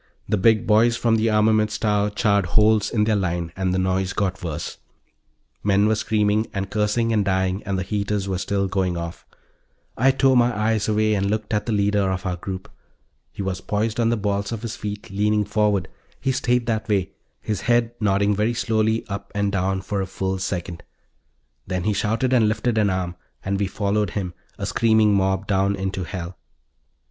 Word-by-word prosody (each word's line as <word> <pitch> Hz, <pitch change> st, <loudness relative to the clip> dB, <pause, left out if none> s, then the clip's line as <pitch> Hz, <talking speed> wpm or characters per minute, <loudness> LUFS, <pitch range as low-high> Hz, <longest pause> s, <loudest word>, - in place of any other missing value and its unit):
The -, -, +1 dB
big 110 Hz, +3 st, +3 dB
boys 115 Hz, +2 st, +4 dB
from 115 Hz, -1 st, +2 dB
the 110 Hz, +1 st, +2 dB
armaments 110 Hz, 0 st, +2 dB
tower 105 Hz, -1 st, +1 dB
charred 100 Hz, -2 st, +1 dB
holes 105 Hz, +2 st, +3 dB
in 105 Hz, -3 st, +1 dB
their 110 Hz, 0 st, +2 dB
line, 85 Hz, -4 st, -1 dB
and 95 Hz, -1 st, -1 dB
the 95 Hz, -, 0 dB
noise 95 Hz, 0 st, 0 dB
got 95 Hz, -2 st, -1 dB
worse; 80 Hz, -4 st, -5 dB, 0.8 s
men 100 Hz, 0 st, +3 dB
were 110 Hz, -, +3 dB
screaming 110 Hz, 0 st, +1 dB
and 95 Hz, 0 st, -3 dB
cursing 110 Hz, +2 st, +1 dB
and 105 Hz, -2 st, +2 dB
dying 95 Hz, 0 st, 0 dB
and 100 Hz, -1 st, 0 dB
the 95 Hz, -, -1 dB
heaters 100 Hz, 0 st, -2 dB
were 95 Hz, -2 st, -2 dB
still 100 Hz, 0 st, 0 dB
going 95 Hz, -2 st, -1 dB
off. 85 Hz, 0 st, -7 dB, 0.7 s
I 130 Hz, +4 st, +3 dB
tore 135 Hz, 0 st, +3 dB
my 120 Hz, -2 st, +3 dB
eyes 110 Hz, -1 st, +1 dB
away 110 Hz, 0 st, +2 dB
and 100 Hz, -1 st, 0 dB
looked 110 Hz, +1 st, -2 dB
at 105 Hz, +1 st, 0 dB
the -, -, 0 dB
leader 100 Hz, -1 st, +2 dB
of 95 Hz, 0 st, -4 dB
our 90 Hz, -1 st, -1 dB
group. 95 Hz, +2 st, -6 dB, 0.6 s
He 100 Hz, -, -5 dB
was 95 Hz, -1 st, -3 dB
poised 110 Hz, +2 st, -1 dB
on 115 Hz, -1 st, +3 dB
the 120 Hz, -, +1 dB
balls 100 Hz, 0 st, -1 dB
of 115 Hz, -1 st, -5 dB
his 115 Hz, -, -4 dB
feet, 105 Hz, -1 st, -6 dB
leaning 105 Hz, +1 st, +1 dB
forward; 105 Hz, -3 st, +1 dB, 0.3 s
he 135 Hz, -, 0 dB
stayed 125 Hz, -2 st, +1 dB
that 110 Hz, -1 st, -2 dB
way, 100 Hz, -2 st, +1 dB, 0.3 s
his 105 Hz, -3 st, -3 dB
head 120 Hz, -1 st, +2 dB
nodding 100 Hz, -1 st, +2 dB
very 110 Hz, +4 st, 0 dB
slowly 110 Hz, -1 st, 0 dB
up 100 Hz, 0 st, -6 dB
and 100 Hz, -1 st, +1 dB
down, 95 Hz, 0 st, 0 dB
for 100 Hz, 0 st, -2 dB
a 95 Hz, -, -3 dB
full 95 Hz, 0 st, -3 dB
second. 90 Hz, -2 st, -4 dB, 0.9 s
Then 90 Hz, -1 st, -2 dB
he 105 Hz, +2 st, +1 dB
shouted 115 Hz, +6 st, 0 dB
and 115 Hz, -4 st, +4 dB
lifted 110 Hz, +1 st, 0 dB
an 105 Hz, -2 st, +3 dB
arm 90 Hz, -2 st, -2 dB, 0.3 s
and 100 Hz, 0 st, -1 dB
we 100 Hz, -, +1 dB
followed 100 Hz, +1 st, 0 dB
him, 90 Hz, -2 st, -4 dB, 0.2 s
a -, -, -3 dB
screaming 110 Hz, -2 st, +3 dB
mob 95 Hz, -1 st, +2 dB
heading -, -, -16 dB
down 100 Hz, 0 st, +1 dB
into 95 Hz, -1 st, -3 dB
hell. 90 Hz, -1 st, -6 dB
105 Hz, 195 wpm, -23 LUFS, 95-110 Hz, 0.9 s, boys